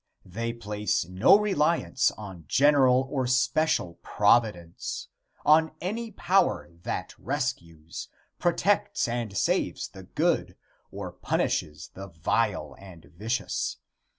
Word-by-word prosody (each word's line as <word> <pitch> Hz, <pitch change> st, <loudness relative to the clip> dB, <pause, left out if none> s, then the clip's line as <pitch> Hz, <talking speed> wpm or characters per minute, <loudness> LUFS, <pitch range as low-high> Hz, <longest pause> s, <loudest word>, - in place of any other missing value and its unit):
They 115 Hz, +6 st, -3 dB
place 105 Hz, -5 st, -2 dB
no 95 Hz, -, +5 dB
reliance 170 Hz, -9 st, +1 dB
on 95 Hz, -6 st, -9 dB
general 135 Hz, -, +4 dB
or 130 Hz, -3 st, 0 dB
special 130 Hz, -, +1 dB
providence 105 Hz, -6 st, +1 dB, 0.4 s
on 160 Hz, +1 st, +5 dB
any 225 Hz, +6 st, -3 dB
power 190 Hz, -, +1 dB
that -, -, -4 dB
rescues, 85 Hz, -1 st, -4 dB, 0.3 s
protects 195 Hz, +3 st, +1 dB
and 115 Hz, -4 st, -3 dB
saves -, -, 0 dB
the -, -, -12 dB
good -, -, -1 dB, 0.3 s
or -, -, -6 dB
punishes 75 Hz, +2 st, -2 dB
the 95 Hz, +1 st, -8 dB
vile 85 Hz, -4 st, -1 dB
and 90 Hz, -4 st, -14 dB
vicious. 110 Hz, +7 st, -2 dB
115 Hz, 105 wpm, -27 LUFS, 90-155 Hz, 0.4 s, no